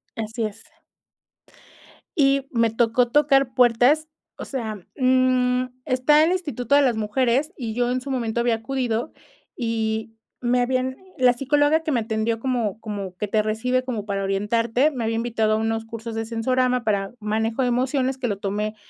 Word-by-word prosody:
Así 225 +1 -4
es. 215 +1 -7 1.5
Y 275 -2 +2
me 230 -2 +2
tocó 235 +1 +2
tocar 275 -2 +3
puertas. 250 +6 +4 0.3
O - - -6
sea, 220 -7 -5 0.2
mm, 255 -1 +3 0.2
está 295 +3 +4
el 335 - +2
Instituto 285 -8 0
de 285 - +6
las 250 -4 +2
Mujeres 250 +7 0
y 230 -4 -4
yo 245 0 +1
en 255 - -1
su 275 - -8
momento 235 -3 -1
había 235 -1 +2
acudido 240 +2 -2 0.4
y 225 -1 -2 0.3
me 245 0 +2
habían 255 +1 -1 0.2
la 250 -1 +5
psicóloga 290 +5 +2
que 315 - -2
me 240 - +1
atendió 220 +1 -1
como 225 -4 -1
como 200 -4 -5
que 210 - -3
te 215 +1 +2
recibe 250 +4 0
como 230 -5 -4
para 200 -1 -2
orientarte, 230 +8 +1
me 250 -4 -4
había 225 - -1
invitado 225 -2 0
a - - +3
unos 225 0 -1
cursos 230 0 -7
de 225 0 -2
sensorama 250 +2 0
para 200 -2 -1
manejo 220 +3 -1
de 250 - +2
emociones 260 +2 0
que 255 - -2
lo 205 -3 -2
tomé 210 +2 -3
240 Hz, 170 wpm, -23 LUFS, 220-255 Hz, 1.5 s, de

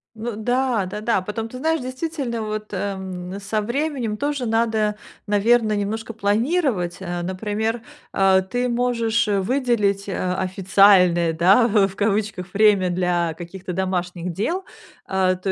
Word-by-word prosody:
Ну 225 0 -5
да-да-да. 220 -3 0
Потом, 220 +3 -4
ты 255 - -8
знаешь, 320 +3 0
действительно, 255 -3 -4
вот, 215 0 -4
ам, 190 -1 -4
со 210 +2 -2
временем 250 -1 -2
тоже 285 0 -2
надо, 220 -2 +1 0.3
наверно, 215 +2 +3
немножко 220 +3 -3
планировать, 220 - 0
а. 175 -1 -4
Например, 215 +5 -2 0.3
а 190 -1 +4
ты 245 +6 -2
можешь, 235 -2 +1
э, 200 -1 +1
выделить, 210 -4 0
а, 185 -1 -2
официальное, 185 -2 +4
да, 190 +9 +5
в 205 -3 +3
в, 195 - -11
кавычках, 205 -3 -1
"время" 200 -3 +4
для 175 -2 0
каких-то 180 +3 -7
домашних 180 -1 -2
дел. 335 - -2 0.4
А, 190 -1 +1
то 185 +1 -3
210 Hz, 135 wpm, -22 LUFS, 190-235 Hz, 0.4 s, да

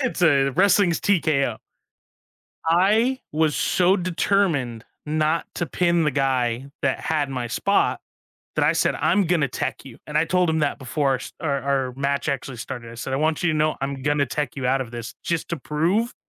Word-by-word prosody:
It's 255 -8 -2
a 140 -5 +4
wrestling's 185 +2 +3
TKO. 155 -8 +1 1.1
I 215 +10 +3
was 155 -1 +1
so 185 +7 +3
determined 170 - 0 0.2
not 155 +2 0
to 175 - -1
pin 170 +2 +1
the 150 - +1
guy 130 -1 0
that 135 -2 0
had 150 -3 -1
my 125 -3 -3
spot, 200 - +1 0.5
that - - +1
I - - +4
said, - - +1
"I'm 205 - +2
gonna 160 -5 +2
tech - - -4
you." 125 -4 -12
And 150 - -4
I 160 - +3
told 180 0 +1
him 160 0 0
that 150 -1 0
before 135 +2 -1
our - - +3
s 130 - -9
our 140 -4 -1
our 135 -2 0
match 140 +2 -1
actually 135 -2 -3
started. 115 0 -7
I - - -10
said, 120 +3 -5
"I - - +1
want 155 +3 0
you 175 - +2
to 155 - -1
know 155 0 +1
I'm 135 0 -3
gonna 145 0 +1
tech 145 0 -3
you 130 - -2
out 135 +1 +2
of 120 -3 -5
this, 120 -1 -7
just 170 -1 -2
to 170 - -1
prove 170 - 0
150 Hz, 200 wpm, -23 LUFS, 135-170 Hz, 1.1 s, a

